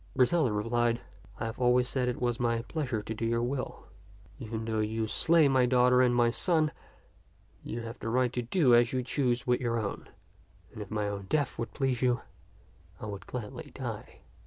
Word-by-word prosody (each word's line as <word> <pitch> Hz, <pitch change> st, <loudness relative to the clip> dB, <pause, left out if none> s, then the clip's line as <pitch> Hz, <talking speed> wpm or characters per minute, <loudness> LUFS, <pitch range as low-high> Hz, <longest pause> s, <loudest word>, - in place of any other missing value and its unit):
Griselda 130 Hz, 0 st, +3 dB
replied, 115 Hz, +3 st, +1 dB, 0.2 s
" 110 Hz, -, -22 dB
I 115 Hz, -, -2 dB
have 115 Hz, +2 st, -5 dB
always 125 Hz, 0 st, +3 dB
said 125 Hz, -1 st, -1 dB
it 125 Hz, -, -3 dB
was 120 Hz, -2 st, -1 dB
my 115 Hz, -1 st, 0 dB
pleasure 120 Hz, -5 st, -3 dB
to 110 Hz, -, -4 dB
do 110 Hz, -, -5 dB
your 115 Hz, +1 st, +1 dB
will. 130 Hz, +1 st, -4 dB, 0.5 s
Even 110 Hz, 0 st, -5 dB
though 110 Hz, -1 st, -1 dB
you 110 Hz, +1 st, -1 dB
slay 160 Hz, +7 st, +4 dB
my 130 Hz, -2 st, +3 dB
daughter 125 Hz, 0 st, +4 dB
and 125 Hz, -1 st, +3 dB
my 120 Hz, -1 st, +4 dB
son, 155 Hz, +1 st, +1 dB, 0.9 s
you 115 Hz, -, -5 dB
have 115 Hz, +1 st, -8 dB
the 115 Hz, -, -4 dB
right 125 Hz, +1 st, +1 dB
to 125 Hz, -, -1 dB
do 125 Hz, +2 st, +3 dB
as 120 Hz, +1 st, +5 dB
you 130 Hz, -1 st, 0 dB
choose 125 Hz, -1 st, 0 dB
with 125 Hz, 0 st, +1 dB
your 115 Hz, -1 st, 0 dB
own; 100 Hz, -2 st, -5 dB, 0.6 s
and 110 Hz, -, -8 dB
if 100 Hz, -, -7 dB
my 105 Hz, -1 st, -1 dB
own 100 Hz, -1 st, -5 dB
death 145 Hz, -2 st, 0 dB
would 115 Hz, -, -4 dB
please 135 Hz, -4 st, 0 dB
you, 125 Hz, -2 st, +2 dB, 0.8 s
I -, -, -6 dB
would 100 Hz, -3 st, -7 dB
gladly 120 Hz, -4 st, -6 dB
die." -, -, -6 dB
120 Hz, 200 wpm, -30 LUFS, 115-125 Hz, 0.9 s, as